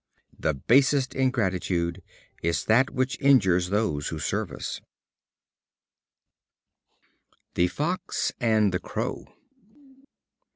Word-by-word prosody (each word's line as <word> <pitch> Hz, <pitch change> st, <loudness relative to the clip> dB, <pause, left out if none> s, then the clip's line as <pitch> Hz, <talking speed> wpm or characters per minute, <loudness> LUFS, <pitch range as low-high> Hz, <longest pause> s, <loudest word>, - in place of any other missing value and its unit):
The 80 Hz, -2 st, 0 dB
basest 135 Hz, -, +3 dB
ingratitude 95 Hz, -8 st, -1 dB, 0.4 s
is 85 Hz, 0 st, -1 dB
that 125 Hz, +5 st, +4 dB
which 130 Hz, +1 st, -2 dB
injures 95 Hz, -11 st, +4 dB
those 100 Hz, -8 st, 0 dB
who 80 Hz, -, -4 dB
serve -, -, -2 dB
us. -, -, -6 dB, 2.7 s
The 90 Hz, -, +2 dB
Fox 155 Hz, -, -2 dB
and 110 Hz, -4 st, +2 dB
the 90 Hz, -, 0 dB
Crow. -, -, -4 dB
105 Hz, 90 wpm, -26 LUFS, 90-130 Hz, 2.7 s, that